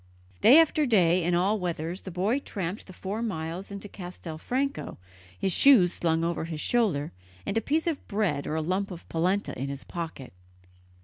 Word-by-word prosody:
Day 260 Hz, +6 st, +8 dB
after 310 Hz, -2 st, +4 dB
day, 180 Hz, -6 st, +4 dB
in 175 Hz, +1 st, +1 dB
all 195 Hz, +5 st, +2 dB
weathers, 175 Hz, 0 st, -3 dB
the -, -, -8 dB
boy 195 Hz, +9 st, 0 dB
tramped 195 Hz, -6 st, -5 dB
the -, -, -10 dB
four 200 Hz, +5 st, -4 dB
miles 180 Hz, -3 st, -4 dB
into 200 Hz, 0 st, -7 dB
Castelfranco, 190 Hz, -, -4 dB, 0.4 s
his 190 Hz, -, +1 dB
shoes 205 Hz, -10 st, +6 dB
slung 165 Hz, -1 st, 0 dB
over 170 Hz, -1 st, -1 dB
his 160 Hz, -2 st, -5 dB
shoulder, 185 Hz, -10 st, +1 dB, 0.3 s
and -, -, -2 dB
a 225 Hz, -, +2 dB
piece 310 Hz, +8 st, 0 dB
of 330 Hz, -4 st, -3 dB
bread 200 Hz, -9 st, -1 dB
or 155 Hz, -, -2 dB
a 160 Hz, -, -1 dB
lump 185 Hz, +4 st, -1 dB
of 175 Hz, -3 st, -10 dB
polenta 185 Hz, +5 st, 0 dB
in 135 Hz, +1 st, -3 dB
his 140 Hz, -1 st, -6 dB
pocket. 160 Hz, -, -7 dB
185 Hz, 180 wpm, -27 LUFS, 165-215 Hz, 0.4 s, Day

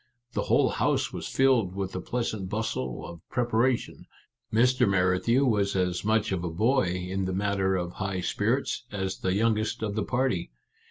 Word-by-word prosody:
The -, -, 0 dB
whole -, -, +4 dB
house -, -, 0 dB
was -, -, -5 dB
filled 125 Hz, -9 st, +2 dB
with 95 Hz, -1 st, -3 dB
the 95 Hz, -, -4 dB
pleasant 110 Hz, -5 st, -3 dB
bustle 95 Hz, -, -3 dB
of 85 Hz, -2 st, -9 dB
preparation. 120 Hz, 0 st, 0 dB, 0.4 s
Mr. 125 Hz, 0 st, +3 dB
Merrithew 95 Hz, +8 st, +2 dB
was 100 Hz, -5 st, +1 dB
as 90 Hz, -1 st, 0 dB
much 110 Hz, 0 st, +1 dB
of 90 Hz, -3 st, -1 dB
a 90 Hz, -, -2 dB
boy, 110 Hz, +9 st, +2 dB
in 90 Hz, +2 st, -2 dB
the 95 Hz, -, -2 dB
matter 95 Hz, -1 st, +1 dB
of 90 Hz, -1 st, -2 dB
high 95 Hz, -1 st, -3 dB
spirits, -, -, -1 dB
as 95 Hz, -2 st, -3 dB
the 95 Hz, 0 st, 0 dB
youngest 110 Hz, 0 st, +1 dB
of 105 Hz, -2 st, -1 dB
the 110 Hz, -, -1 dB
party. 120 Hz, -7 st, 0 dB
100 Hz, 170 wpm, -27 LUFS, 90-115 Hz, 0.4 s, whole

